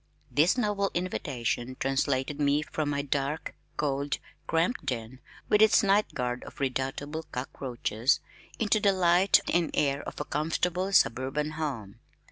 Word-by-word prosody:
This 160 - +3
noble 205 -4 +1
invitation 130 -8 -2
translated 135 +1 0
me 145 +1 +2
from 150 -1 -3
my 140 -1 -1
dark, 140 +2 -2 0.2
cold, 140 -1 -1 0.3
cramped 170 +4 +1
den 125 -2 -4 0.3
(with 210 - +4
its 220 0 +6
night 200 +2 +2
guard 125 -1 -2
of - - -12
redoubtable 140 +4 -2
cockroaches) 125 -1 -1 0.4
into 215 -1 +2
the 200 -1 +3
light 180 +1 +4
and 175 -1 +2
air 140 -1 +1
of - - -8
a - - -2
comfortable 180 +5 -1
suburban 135 - +2
home. 130 -10 -4
145 Hz, 135 wpm, -28 LUFS, 130-175 Hz, 0.4 s, its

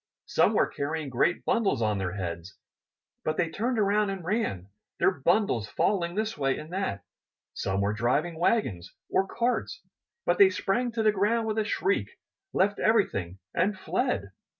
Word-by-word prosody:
Some - - +3
were - - +4
carrying 150 +1 -3
great 135 +8 +1
bundles 225 - +2
on 105 -3 +1
their 90 -2 -2
heads, 85 -2 -5 0.7
but 155 - -1
they 170 -2 0
turned 235 +7 -1
around 205 0 +2
and 190 -3 -5
ran, 170 - -1 0.3
their - - +4
bundles 145 - +1
falling 175 -4 0
this 220 +1 -1
way 135 -2 0
and 155 +3 -9
that. 185 - -2 0.5
Some 95 +1 -1
were 100 +1 +1
driving 140 +9 0
wagons 120 - 0 0.2
or 195 - +2
carts, 240 +4 -1 0.5
but - - +1
they 395 -1 +9
sprang 245 - 0
to 225 -1 0
the 215 - +5
ground 215 +3 +1
with 220 0 -1
a - - +2
shriek, 395 - -1 0.3
left 200 +2 +1
everything, 100 - +1 0.2
and 190 +3 +1
fled. 100 - -1
180 Hz, 165 wpm, -28 LUFS, -, 0.7 s, they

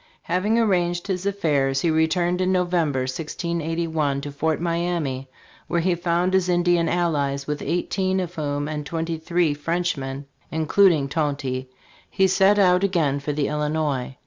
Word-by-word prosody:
Having 185 +6 +1
arranged 175 -6 +1
his 190 -1 -2
affairs, 145 -9 +1
he 170 - +2
returned 175 +3 +1
in 185 0 +1
November, 175 -7 +1
1681, 160 +1 -2
to 145 0 -6
Fort 155 +2 -1
Miamis, 170 -6 -1 0.4
where 170 - 0
he 180 +1 +2
found 175 +1 0
his 185 -1 +2
Indian 175 -1 +2
allies, 145 -5 0
with 150 0 -3
eighteen 185 +2 -1
of 180 -2 -4
whom 145 -3 -2
and 150 -1 -4
twenty 165 +1 -3
three 170 -1 +1
French 170 +4 -1
men, 135 +1 -5 0.2
including 160 -1 +3
Tonty, 140 -3 -2 0.4
he 190 - +2
set 195 +2 +4
out 180 -1 +4
again 160 -8 +1
for 145 +1 -3
the 145 -1 -1
Illinois. 150 -3 -2
165 Hz, 150 wpm, -23 LUFS, 145-180 Hz, 0.4 s, set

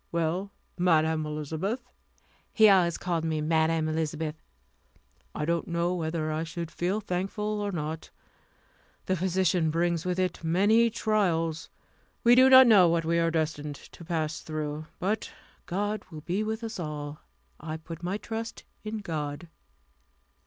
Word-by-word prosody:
Well, 170 +4 -1 0.3
Madam 160 -3 +2
Elizabeth" 160 - -3 0.6
he 220 -1 +6
always 180 -4 +4
called 170 -2 -2
me 160 -1 -1
Madam 160 +1 +2
Elizabeth 155 0 -2 0.9
"I 150 - -2
don't 170 +1 0
know 170 +1 0
whether 160 -2 -2
I 155 +1 -1
should 165 0 -5
feel 185 +5 -1
thankful 210 +3 -2
or 205 0 -2
not. 160 -2 -4 1.0
The 185 - +1
position 180 -2 +1
brings 170 +1 0
with 180 0 -1
it 185 -2 -1
many 205 +8 +4
trials. 180 -8 0 0.5
We 235 - +7
do 260 +1 +7
not 260 0 +10
know 205 -7 +7
what 165 -1 +1
we 170 +1 +2
are 165 0 +2
destined 155 -2 -2
to 170 - -14
pass 160 -2 -2
through. 155 0 -4
But 205 +4 -2 0.4
God 205 +3 -2
will 155 -3 -9
be 180 +6 -1
with 220 +2 -3
us 225 -3 -5
all. 150 -2 -5 0.4
I 155 +1 -5
put 165 +1 -9
my 180 +3 -2
trust 225 +1 -6 0.2
in 215 0 -4
God." 155 -2 -4
170 Hz, 145 wpm, -28 LUFS, 160-195 Hz, 1.0 s, not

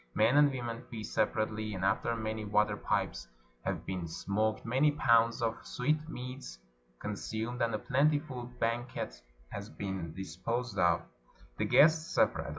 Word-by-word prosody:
Men 115 +5 +4
and 145 0 +7
women 120 -2 -4
feast 110 -3 -6
separately; 110 -1 0
and 95 0 -2
after 115 +4 +1
many 110 -1 -3
water 105 0 +2
pipes - - -1 0.4
have - - -2
been 90 -3 -3
smoked, 110 +6 -1
many 130 +6 +3
pounds 115 -4 +3
of 115 -1 -1
sweetmeats 130 - -3 0.4
con 105 - -4
sumed, 110 +4 -4
and 115 -1 +1
a - - +1
plentiful 140 +1 +1
banquet 115 - -2 0.3
has 100 +1 -6
been 95 -5 -4
disposed 115 +6 -3
of, 85 -1 +4 0.6
the - - +2
guests 155 +2 +5
separate. - - +2
115 Hz, 145 wpm, -32 LUFS, 100-125 Hz, 0.6 s, and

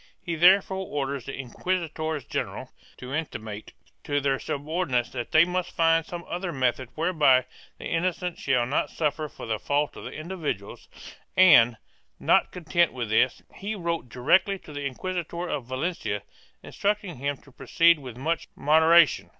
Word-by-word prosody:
He 175 -2 -4
therefore 190 +3 +4
orders 140 -3 -3
the 135 - -5
inquisitors 155 +2 -3
general - - -4 0.3
to 125 +1 -8
intimate 110 -9 -5 0.3
to 145 0 0
their 135 -1 0
subordinates 150 -4 -2
that 120 -3 -5
they 160 +2 +6
must 180 0 -3
find 165 -1 +3
some 175 -1 -7
other 175 0 -3
method 130 -3 -1
whereby 155 -6 +3 0.3
the - - -9
innocent 180 +1 -2
shall 125 -3 +1
not 135 +5 0
suffer 150 -1 -2
for - - -10
the 110 -2 -2
fault 145 +1 0
of - - -8
individuals 155 - -5 0.5
and, 125 -11 +7 0.4
not - - +3
content 175 -1 +1
with 120 -4 -4
this, 125 +3 +2
he 210 +2 -5
wrote 170 -8 -3
directly 175 - +2
to 155 - -13
the 145 0 -5
Inquisitor 175 +4 -4
of 140 -7 -3
Valencia, 130 - -3 0.4
instructing 200 -5 -2
him 140 +2 -2
to 140 - -20
proceed 165 +6 +3
with 125 -4 -9
much 160 +5 -2
moderation. 160 +2 +4
155 Hz, 150 wpm, -26 LUFS, 130-175 Hz, 0.5 s, and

